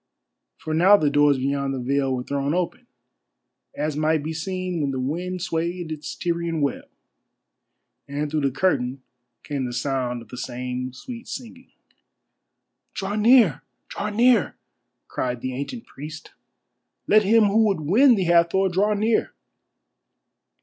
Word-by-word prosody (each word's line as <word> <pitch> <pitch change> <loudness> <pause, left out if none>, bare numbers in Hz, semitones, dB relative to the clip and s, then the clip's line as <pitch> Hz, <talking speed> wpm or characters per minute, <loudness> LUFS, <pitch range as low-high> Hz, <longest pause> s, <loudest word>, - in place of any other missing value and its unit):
For 155 - -5
now 185 +6 +6
the 150 -6 +1
doors 145 -1 +4
beyond 135 +1 -1
the - - -4
veil 135 +2 0
were 125 - -4
thrown 140 +3 -1
open, 180 -1 -3 0.9
as 150 0 -2
might 155 0 +1
be 160 +2 -4
seen 185 +1 -3
when 140 - 0
the 130 -1 -3
wind 175 +7 -3
swayed 170 0 -3
its 155 -1 -6
Tyrian 170 -2 -2
web, 140 -2 -2 1.2
and 145 +1 -3
through 155 -1 0
the 140 - +2
curtain 130 -4 0 0.4
came 140 -3 -3
the 120 - -5
sound 125 -2 -2
of 110 - -21
the 125 - -9
same 125 0 -4
sweet 235 - -9
singing. 255 0 -9 1.3
"Draw 200 -1 -3
near! 220 - +5 0.3
Draw 210 - -3
near!" 230 -2 +3 0.5
cried 125 -1 -3
the 130 0 -3
ancient 145 - -6
priest. 150 +3 -10 0.7
"Let 215 +1 +5
him 220 +2 +4
who 215 +2 +3
would 195 -6 0
win 235 - +5
the 195 - 0
Hathor 170 +3 +3
draw 205 +4 +1
near!" 220 +2 +1
160 Hz, 145 wpm, -23 LUFS, 140-195 Hz, 1.3 s, now